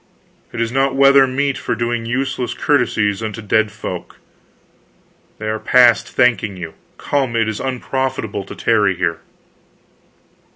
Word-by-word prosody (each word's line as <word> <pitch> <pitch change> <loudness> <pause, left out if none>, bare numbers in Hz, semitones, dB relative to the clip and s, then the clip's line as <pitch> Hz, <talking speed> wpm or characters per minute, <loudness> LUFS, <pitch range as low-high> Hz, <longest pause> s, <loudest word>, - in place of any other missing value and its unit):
"It 120 - -6
is 115 -1 -1
not 135 +1 +1
weather 135 0 +6
meet 140 +1 -1
for - - -2
doing 120 -1 -2
useless 130 +1 -2
courtesies 110 -8 +1
unto 110 0 -5
dead 110 0 +1
folk. - - -7 1.2
They 110 - -6
are 110 0 -2
past 120 -4 +4
thanking 105 -5 +1
you. 85 -3 -7 0.2
Come 135 -5 -1
it 115 -1 +1
is 110 -1 -3
unprofitable 130 -5 -3
to - - -9
tarry 105 -4 +2
here." 85 -2 -1
115 Hz, 135 wpm, -18 LUFS, 105-130 Hz, 1.2 s, weather